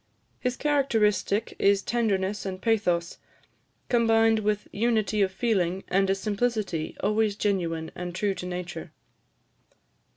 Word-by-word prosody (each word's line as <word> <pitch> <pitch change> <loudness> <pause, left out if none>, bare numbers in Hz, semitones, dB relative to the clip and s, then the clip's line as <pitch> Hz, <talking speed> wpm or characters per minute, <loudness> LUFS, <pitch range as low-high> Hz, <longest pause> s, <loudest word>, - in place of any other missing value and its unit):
His 250 0 -2
characteristic 225 -8 +1
is 200 0 +3
tenderness 205 -4 0
and 190 -1 -4
pathos, 180 -6 0 0.7
combined 225 -2 +3
with 210 -1 -1
unity 215 -1 +1
of 190 -1 +2
feeling, 190 -4 0
and 195 +1 +2
a 195 - +3
simplicity 205 -5 -2
always 210 0 +2
genuine 170 -6 -1
and 175 -1 -6
true 200 +1 0
to 180 - -6
nature. 180 -1 -6
205 Hz, 120 wpm, -26 LUFS, 185-225 Hz, 0.7 s, is